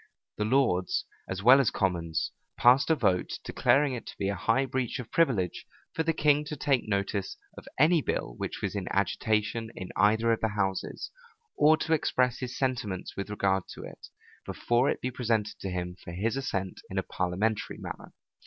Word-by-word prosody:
The 105 - +1
lords, 110 -7 +2 0.2
as 95 +1 -4
well 130 +4 +8
as 135 - +3
commons, 85 -4 -1 0.3
passed 130 +5 +5
a 160 - +5
vote, 100 - 0
declaring 140 -1 +2
it 120 - -6
to - - -9
be 100 - -1
a 100 - -1
high 115 +8 +1
breach 130 -2 -2
of 120 -3 -8
privilege 115 - +1 0.3
for - - -1
the 165 0 +2
king 150 -2 +3
to 150 - -5
take 135 -4 +1
notice 100 -1 -1 0.2
of - - -12
any 160 +3 +5
bill - - -2
which - - -5
was - - -1
in 100 -3 -4
agitation 110 +3 0
in 95 - -7
either 110 +4 +3
of 115 - 0
the 110 - +2
houses, 95 -2 -2 0.4
or 155 +2 +5
to 160 0 0
express 125 -5 +1
his 125 -1 -5
sentiments 120 -8 -2
with 100 +1 -4
regard 95 -2 0
to - - -9
it, - - -10 0.4
before 120 +3 +1
it - - -2
be 130 - -2
presented 115 -4 -1
to 95 - -4
him 90 -1 -4
for 85 - -8
his 110 +7 -1
assent 95 -9 -3
in 95 - -5
a 95 - +1
parliamentary 95 +6 -1
manner. - - -8
110 Hz, 190 wpm, -28 LUFS, 95-130 Hz, 0.4 s, well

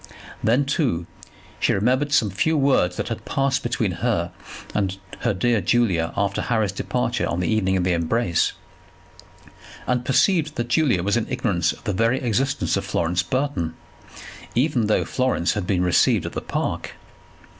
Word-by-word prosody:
Then, 125 +6 +3
too, 130 - 0 0.5
she - - +2
remembered 130 +8 +1
some 115 -9 +3
few 160 - +1
words 135 -11 +2
that - - -3
had - - -4
passed 135 0 0
between - - -1
her - - 0 0.4
and 95 -2 -1 0.2
her 120 - +1
dear 110 +3 +1
Julia 95 -5 +1
after 100 -1 0
Harry's 110 -5 0
departure - - -1
on 85 - -2
the 90 - -1
evening 95 -4 +1
of 90 - 0
the 90 0 +1
embrace, 85 +1 +1 1.3
and 125 -1 0
perceived 155 +3 +2
that 120 0 -3
Julia 120 - +2
was 100 +4 +1
in 115 - -1
ignorance 100 -10 0
of - - -12
the 105 - -1
very 115 +6 +2
existence 130 +4 0
of - - -1
Florence 85 +2 0
Burton, 110 - -2 0.8
even 125 -3 +2
though 105 - +2
Florence 125 -9 0
had 105 -4 -3
been 90 -3 +1
received 90 -3 +3
at - - -5
the - - -3
Park. - - -3
110 Hz, 165 wpm, -23 LUFS, 90-130 Hz, 1.3 s, Then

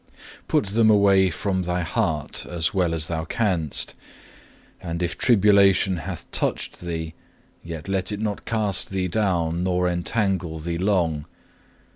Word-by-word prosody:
2. - - -28
"Put - - +2
them 110 +2 +3
away 100 -2 +5
from 95 +3 -2
thy 90 0 -1
heart 75 -2 -2
as 85 -1 -1
well 90 -3 +1
as 80 -1 +1
thou 80 -1 -2
canst, 85 - -1 0.9
and 85 0 -3
if 85 - -1
tribulation 100 -4 +4
hath 85 0 -6
touched - - -1
thee, 80 -2 -4 0.5
yet 85 -1 -7
let 95 0 -1
it 105 - -3
not 105 -2 -3
cast 105 -4 -1
thee 95 -1 -1
down 85 -4 0
nor 90 -1 +1
entangle 90 -2 -1
thee 85 +2 -3
long. 85 -6 +1
90 Hz, 145 wpm, -24 LUFS, 85-100 Hz, 0.9 s, away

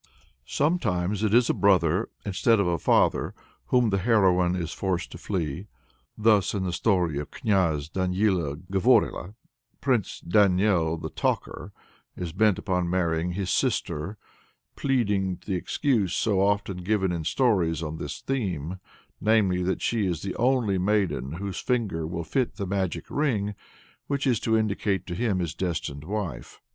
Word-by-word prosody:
Sometimes 105 - 0
it 110 -2 +1
is 120 +2 +5
a - - +2
brother, 95 -1 +2 0.2
instead 105 +3 +2
of 100 - +2
a 85 -2 0
father, - - +2
from - - -28 0.4
whom 120 - +2
the 100 - +1
heroine 90 -4 +3
is 85 -3 -3
forced 95 -3 -2
to - - -9
flee. 90 -1 -3 0.5
Thus 105 -2 +3
in 95 - -1
the 90 -2 -2
story 90 -7 +1
of 75 +1 -6
Kniaz 85 - 0
Danila 90 -3 0 0.2
Govorila, 95 +1 +2 0.4
Prince 125 -8 0
Daniel 90 -3 +2
the 80 0 -6
Talker - - -2 0.5
is 85 -2 -4
bent 105 0 +3
upon 90 -2 -1
marrying 85 -1 0
his 95 -1 -2
sister, 80 +8 -1 0.6
pleading 100 -9 0
the 100 - -2
excuse 105 - 0
so 100 -4 +1
often 100 -1 +1
given 95 0 0
in 85 -2 -3
stories 85 - +1
on 80 0 -4
this - - -6
theme, 95 - -3 0.4
namely, 100 -4 +3
that 90 +1 -1
she 110 -4 +1
is 85 -3 -2
the 100 - -4
only 120 -6 +2
maiden 95 -8 0
whose 95 +2 -4
finger 105 -11 -1
will 85 0 -4
fit 125 - -1
the 100 - -4
magic 95 -2 -2
ring 110 -9 0 0.5
which 140 0 -1
is 125 -5 +2
to 110 -1 +1
indicate 100 -3 0
to 90 - -5
him 100 +1 0
his 85 -4 -2
destined 75 -5 -3
wife. 95 - -5
95 Hz, 155 wpm, -26 LUFS, 85-105 Hz, 0.6 s, is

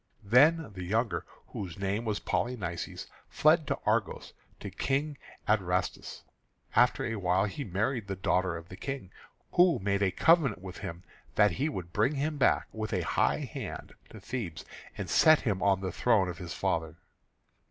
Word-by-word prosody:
Then 140 +7 +4
the 90 -1 -6
younger, 100 -2 -1 0.2
whose 90 -4 -6
name 100 +4 -2
was 105 -2 -1
Polynices, 95 -9 -3 0.2
fled - - +3
to - - 0
Argos, - - -1 0.3
to - - -7
King 145 +3 -1 0.3
Adrastus. 95 -4 -1
And - - -36 0.5
after - - +2
a 115 - -2
while 95 0 +2
he 105 +8 -4
married 110 +3 -2
the 95 - -3
daughter 90 -1 0
of 85 +2 -11
the 95 - -8
King, 135 -5 -6 0.4
who 175 -5 +5
made 100 -1 -1
a 100 - +3
covenant 140 - +3
with 95 -2 -8
him 85 +2 -7 0.3
that 105 -1 +5
he 140 - -1
would 85 - -6
bring 120 +8 +2
him 150 +2 -1
back - - +3
with 110 -1 -4
a 90 - +1
high - - +1
hand - - -6 0.2
to - - -11
Thebes, 110 -11 -5 0.3
and - - -4
set 155 -1 +5
him 100 -6 -1
on 95 -1 +3
the 95 -1 -3
throne 105 -1 +2
of 85 - -7
his 90 -3 -6
father. 80 -1 -1
100 Hz, 175 wpm, -30 LUFS, 90-125 Hz, 0.5 s, who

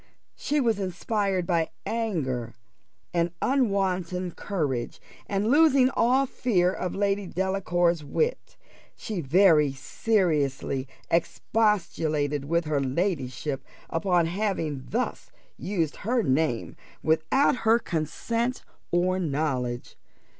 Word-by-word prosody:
She 295 +1 0
was 230 -6 +1
inspired 190 0 -1
by 170 -2 +1 0.2
anger 140 - -2 0.6
with 170 0 +1
unwonted 185 -8 0
courage, 140 -11 -2 0.3
and, 200 +1 0
losing 280 -4 +5
all 260 +3 +3
fear 190 -9 +1
of 180 - -3
Lady 200 -1 0
Delacour's 175 -3 0
wit, 465 - -2 0.4
she 210 -6 -4
very 155 -1 +5
seriously 140 - 0 0.2
expostulated 160 -6 0
with 170 +3 +1
her 150 -2 0
ladyship 135 -2 -2 0.3
upon 175 0 +2
having 165 -7 -2
thus - - -2 0.3
used 170 -6 -2
her 235 +3 0
name 130 - 0 0.3
without 160 - +3
her 225 -1 +4
consent 230 - -2 0.3
or 185 +2 +2
knowledge. 135 -7 -2
175 Hz, 100 wpm, -26 LUFS, 150-205 Hz, 0.6 s, losing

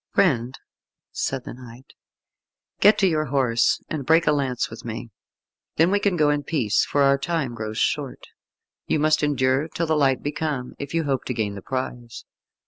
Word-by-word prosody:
"Friend," 125 -10 +2 0.6
said 135 -2 -3
the - - -8
knight, 125 +1 -13 0.9
"get 210 +2 +6
to 195 - +3
your 155 -3 +1
horse, 125 -4 +1
and 155 -3 -4
break 160 +4 +4
a 150 - +4
lance 135 -4 0
with 115 - -10
me. 115 0 -6 0.6
Then 165 +4 +3
we 205 - +3
can 200 -2 +1
go 150 -2 +4
in 145 0 0
peace, 135 -8 +1
for 145 - +1
our 140 0 +4
time 155 -5 -2
grows 110 -1 -5
short. 140 0 -1 0.6
You - - +1
must 155 +1 +2
endure 135 0 +1
till 170 +1 -2
the 160 -1 +1
light 135 -3 +2
be 145 - -1
come 150 -5 -3
if 140 +3 -5
you 165 - +1
hope 135 -3 -1
to 125 - -3
gain 105 -3 -1
the 100 - -8
prize. 120 -1 -5
140 Hz, 190 wpm, -23 LUFS, 125-155 Hz, 0.9 s, get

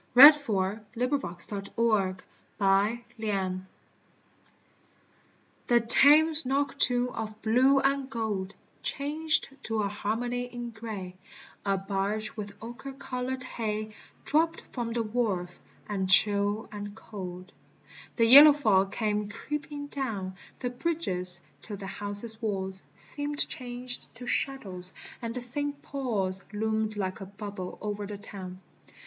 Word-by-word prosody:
WIND 290 +5 +13
FLOWERS 215 -8 -1 0.2
IMPRESSION 220 -6 -2
DU 210 -5 +2 0.4
MATIN 200 -2 0 2.0
THE 240 -1 +5
Thame, 290 +7 +7
noctnn* 270 -3 +1
of 215 -1 -5
blue 260 +5 +5
«1 275 0 +1
gold 210 -5 -3 0.3
Changed 310 +3 +1
to 220 -1 -1
a - - +1
Harmon 220 +4 -2
y 245 0 -2
in 240 -1 -5
gray: 215 -5 -7 0.5
A 195 -1 +1
barge 200 +2 -2
with 205 -2 -6
ochre 240 +4 -7
colored 260 -1 -4
hay 215 -3 -3 0.3
Dropt 325 +2 +2
from 235 -2 -3
the 230 0 0
wharf: 210 -6 -2 0.3
and 190 -3 -2
chili 205 +2 +4
and 205 -1 -7
cold 185 -4 -8 0.6
The 230 - +4
yellow 285 +5 +11
fog 200 -9 +3
came 210 -1 -1
creeping 290 +5 -5
down 225 -10 -4 0.2
The 245 -1 -3
bridges, 190 - -2 0.2
till 210 -2 -7
the 195 - -8
houses' 205 +3 -4
waDs 190 -3 -2
Seemed 290 0 -2
changed 245 -3 -2
to 245 +2 -9
shadows, 190 -9 -2 0.3
and 230 +1 -4
S. 245 +2 -2 0.3
Paul's 205 -9 -1
Loomed 220 0 -1
like 190 0 -3
a 195 - -6
bubble 200 -2 -7
o'er 205 -1 -3
the 205 0 -6
town. 190 -3 -9
220 Hz, 120 wpm, -29 LUFS, 200-250 Hz, 2.0 s, WIND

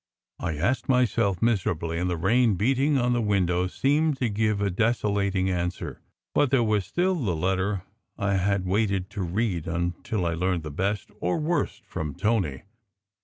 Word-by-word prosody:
I 80 - -2
asked 110 - 0
myself 115 -7 +2
miserably; 90 -7 0
and 90 +1 0
the 90 - -1
rain 115 +5 +3
beating 135 - +2
on 125 -1 +2
the 120 - +1
window 90 -4 +1
seemed 145 +8 +1
to 125 -3 0
give 110 0 0
a 100 -1 0
desolating 100 -2 +1
answer. 90 -1 -3 0.3
But 145 - +3
there 130 -2 +3
was 105 -3 +1
still 185 +2 +1
the 115 - -1
letter 95 +3 0 0.3
I 100 0 0
had 95 0 +1
waited 100 -1 0
to 100 - -4
read 90 -1 -1
until 85 +3 -2
I 85 - 0
learned 90 0 0
the 75 - -6
best 95 +5 -2
or 90 +1 0
worst 160 +3 -1
from 75 -3 -5
Tony. 95 - 0
100 Hz, 170 wpm, -26 LUFS, 90-115 Hz, 0.3 s, rain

